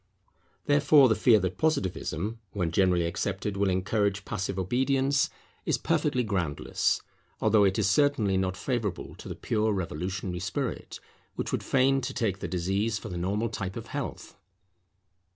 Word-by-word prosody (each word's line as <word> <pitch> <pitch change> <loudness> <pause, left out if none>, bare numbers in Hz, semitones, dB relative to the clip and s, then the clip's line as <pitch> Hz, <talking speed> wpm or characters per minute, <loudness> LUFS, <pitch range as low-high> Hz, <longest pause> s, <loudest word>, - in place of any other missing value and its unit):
Therefore, 145 -1 +6
the 110 - +4
fear 110 0 +5
that 95 0 -3
Positivism, 110 - -1
when 90 -5 -1
generally 90 -1 +3
accepted, 95 +3 -2
will 100 0 +1
encourage 100 +1 0
passive 95 0 -3
obedience, 135 +7 +1 0.3
is - - +1
perfectly 125 - +1
groundless; 90 -9 -1 0.4
although 110 -1 +4
it 95 -1 +2
is 105 - +2
certainly 110 -4 +3
not 95 0 0
favourable 115 -9 -3
to - - -9
the - - -5
pure 110 -1 0
revolutionary 90 +1 -3
spirit, 105 +9 -4 0.4
which - - -3
would - - -1
fain 135 +1 +2
take 115 -7 -2
the - - -4
disease 95 +5 -1
for 110 - -7
the 90 - -5
normal 105 +6 -1
type 100 -4 -4
of - - -7
health. - - -5
100 Hz, 150 wpm, -28 LUFS, 95-120 Hz, 0.4 s, Therefore